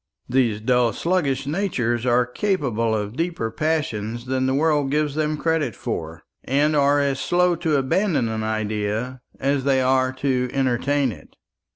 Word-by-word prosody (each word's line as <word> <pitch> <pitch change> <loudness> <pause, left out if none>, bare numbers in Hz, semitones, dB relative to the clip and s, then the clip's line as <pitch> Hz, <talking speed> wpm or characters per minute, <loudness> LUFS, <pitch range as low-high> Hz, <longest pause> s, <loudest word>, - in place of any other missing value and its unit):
These 120 -4 +1
dull 125 -1 +2
sluggish 145 - 0
natures 130 - -1
are 120 0 +3
capable 125 - -1
of 105 +1 -3
deeper 165 -8 -2
passions 120 -5 -2
than 130 0 0
the 130 - +1
world 145 -2 +2
gives 150 0 0
them 155 0 -1
credit 155 - 0
for; - - -5 0.2
and 145 +4 +1
are 145 0 +4
as 140 -1 0
slow 180 0 +2
to 160 -2 0
abandon 140 - +1
an 110 0 -3
idea 110 +3 -2 0.2
as 135 0 0
they 135 -1 +2
are 130 0 +2
to 130 -1 -1
entertain 135 +1 +1
it. - - -14
130 Hz, 155 wpm, -22 LUFS, 120-150 Hz, 0.2 s, are